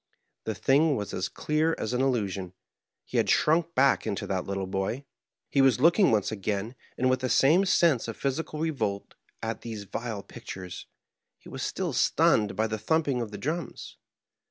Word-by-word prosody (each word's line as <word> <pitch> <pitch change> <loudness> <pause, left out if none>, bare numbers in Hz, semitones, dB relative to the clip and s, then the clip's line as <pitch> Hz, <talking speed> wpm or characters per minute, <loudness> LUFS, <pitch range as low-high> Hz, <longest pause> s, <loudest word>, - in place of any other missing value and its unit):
The 110 - -2
thing 140 +8 +3
was 105 -4 -4
as 90 0 -2
clear 155 +2 0
as 110 - -3
an 125 - +1
illusion; 100 -8 -1 0.5
he - - -4
had - - +2
shrunk 165 +2 +2
back 135 -3 +3
into 100 -3 -2
that 95 -2 -2
little 95 -1 -3
boy; 95 +8 -3 0.4
he 140 - +2
was 130 -3 +4
looking 170 +7 +5
once 105 -2 +1
again, 105 +2 -3 0.2
and 130 - +2
with 130 0 +2
the 130 0 -2
same 165 +11 +4
sense 165 -10 +3
of 115 - -6
physical 150 +3 -3
revolt 120 -11 -2 0.3
at 115 -1 -3
these 110 -3 -6
vile 110 0 -5
pictures; 90 -1 -9 0.5
he - - -15
was - - -6
still - - -2
stunned 105 -1 +3
by 110 - +1
the 110 -1 -3
thumping 140 +1 +1
of 115 - -4
the 105 - -7
drums. 155 - -5
120 Hz, 180 wpm, -27 LUFS, 105-145 Hz, 0.5 s, looking